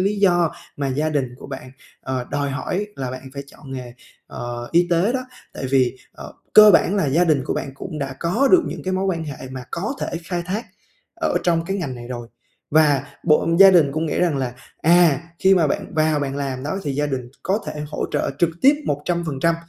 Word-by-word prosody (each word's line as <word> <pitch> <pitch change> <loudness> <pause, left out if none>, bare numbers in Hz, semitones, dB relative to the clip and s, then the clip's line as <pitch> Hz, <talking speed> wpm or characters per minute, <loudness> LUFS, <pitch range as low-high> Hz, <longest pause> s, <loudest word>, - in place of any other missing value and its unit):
lý 200 +2 0
do 175 -5 +3 0.2
mà 140 -1 -1
gia 145 +4 0
đình 135 -5 -2
của - - -11
bạn, 130 -2 -8 0.3
ờ, 130 -2 -3
đòi 145 -1 -1
hỏi 180 +9 -2
là 130 -2 -3
bạn 130 0 -7
phải 140 - -5
chọn 135 -1 -12
nghề, 125 -2 -7 0.3
ờ, 120 0 -6
y 175 +1 +4
tế 175 +7 +2
đó. 255 -1 -2 0.3
Tại 130 - -4
vì, 130 -1 +2 0.2
ờ, - - -10 0.2
cơ 215 0 +9
bản 195 +2 +4
là 180 - +1
gia 160 +6 +3
đình 150 -5 +2
của - - -2
bạn - - -3
cũng 155 +2 -7
đã 135 -1 -4
có 225 +12 +2
được 355 -2 +6
những - - -5
cái 185 - -2
mối 190 +1 0
quan 170 -4 -1
hệ 135 -3 -7
mà 130 -1 -7
có 210 +10 -3
thể - - -1 0.2
khai 175 -1 -3
thác 210 +6 -3 0.6
ở - - +1
trong 165 -2 +1
cái 195 +2 -1
ngành 155 -9 -3
này 120 -1 -9
rồi. 120 -2 -6 0.4
Và 145 -3 +4 0.2
bộ 155 0 +3
gia 195 - +10
đình 160 -7 +4
cũng 160 +2 -1
nghĩ 150 - -2
rằng 170 -5 +2
là, 130 -2 -2 0.3
à, 170 -4 +5 0.2
khi 190 0 +5
mà 170 -4 +3
bạn 145 - -3
vào 155 -1 +2
bạn 140 -1 -3
làm 135 -2 -3
đó 155 +7 -3
thì 145 - -2
gia 145 +2 0
đình 130 -4 -4
có 195 +3 +1
thể 150 - -5
hỗ - - -3
trợ 145 - 0
trực 170 0 +3
tiếp 280 +2 +7
100%, 165 +1 0
150 Hz, 230 wpm, -21 LUFS, 135-175 Hz, 0.6 s, gia